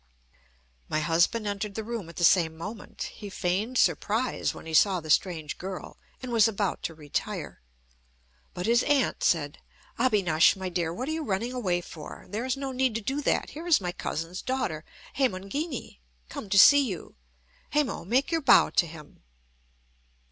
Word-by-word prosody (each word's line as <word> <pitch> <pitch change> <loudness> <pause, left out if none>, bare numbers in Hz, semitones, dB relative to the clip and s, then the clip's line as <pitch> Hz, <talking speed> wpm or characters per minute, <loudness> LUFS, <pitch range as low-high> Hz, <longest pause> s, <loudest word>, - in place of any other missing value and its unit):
My 155 - 0
husband 170 +8 +2
entered 205 0 -3
the 220 - -3
room 225 -6 -5
at 170 - -12
the - - -3
same 165 -2 +4
moment. 205 +6 -7
He 205 - -9
feigned 200 +6 -1
surprise 215 - +1
when - - -11
he 160 - -7
saw 185 +3 +4
the 155 -2 -4
strange 160 -4 0
girl, 185 0 -6 0.3
and 255 - -5
was 230 -2 +5
about 205 -3 -2
to 165 - -4
retire. 150 -2 -4 0.9
But 180 0 -3
his 235 +2 +4
aunt 280 -4 +1
said: 145 -4 +1 0.4
"Abinash, 195 -10 +4
my 190 -1 -4
dear, 170 -2 -1
what 250 +10 -4
are - - -1
you 320 0 -2
running 230 +2 -2
away 185 -8 0
for? 160 -3 -10
There 215 +5 -3
is 260 +1 -1
no 270 -1 -4
need 260 -3 0
to 230 - -1
do 270 +7 -2
that. - - 0
Here 325 +4 -8
is 335 - +5
my 180 -3 -3
cousin's 170 +1 -4
daughter, 255 -13 -2 0.3
Hemangini, 260 - -2 0.3
come 205 - -7
to 200 - +2
see 285 +8 +8
you. 195 -10 -5 0.6
Hemo, 295 -3 0
make 250 - +1
your 330 -1 +1
bow 275 - +6
to 170 - +2
him." 155 -2 -13
200 Hz, 175 wpm, -27 LUFS, 170-250 Hz, 0.9 s, see